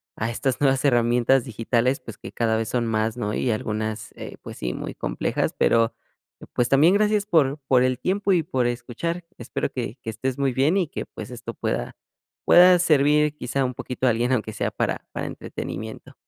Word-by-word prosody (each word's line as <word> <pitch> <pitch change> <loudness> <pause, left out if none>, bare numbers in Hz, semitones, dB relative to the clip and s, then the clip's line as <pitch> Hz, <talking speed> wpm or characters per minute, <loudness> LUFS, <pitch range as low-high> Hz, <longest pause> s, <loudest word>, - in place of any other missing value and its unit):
a 110 - -2
estas 130 +4 -2
nuevas 135 0 +2
herramientas 120 0 +3
digitales, 120 +3 0
pues 115 -5 -10
que - - -9
cada 110 -1 +1
vez 115 - -2
son 120 -2 0
más, 110 0 0
¿no?, 105 -3 -2
y 125 - 0
algunas, 110 0 -3
eh, - - -8
pues - - -9
sí, - - -3
muy - - -5
complejas, - - -2
pero, 115 0 +3 0.6
pues 120 - +1
también 155 +7 +5
gracias 210 0 +2
por 155 -7 +2
por 125 -2 +4
el 130 -1 +2
tiempo 195 +6 0
y 170 -3 +2
por 130 -7 0
escuchar, 130 +8 -3 0.2
espero 120 +1 -3
que 120 -1 -4
que 110 - -3
estés 130 +4 -3
muy 135 -2 +1
bien 140 +9 +2
y 180 -6 0
que, - - -5
pues - - -9
esto - - -7
pueda - - -3 0.5
pueda 180 +1 +8
servir 150 -2 +3
quizá 130 0 -1
un 125 - -2
poquito 125 +2 -4
a 125 - +5
alguien, 120 +3 0
aunque 110 -3 0
sea - - -1
para - - -2
para - - -4
entretenimiento. 110 +3 -7
125 Hz, 195 wpm, -24 LUFS, 115-145 Hz, 0.6 s, pueda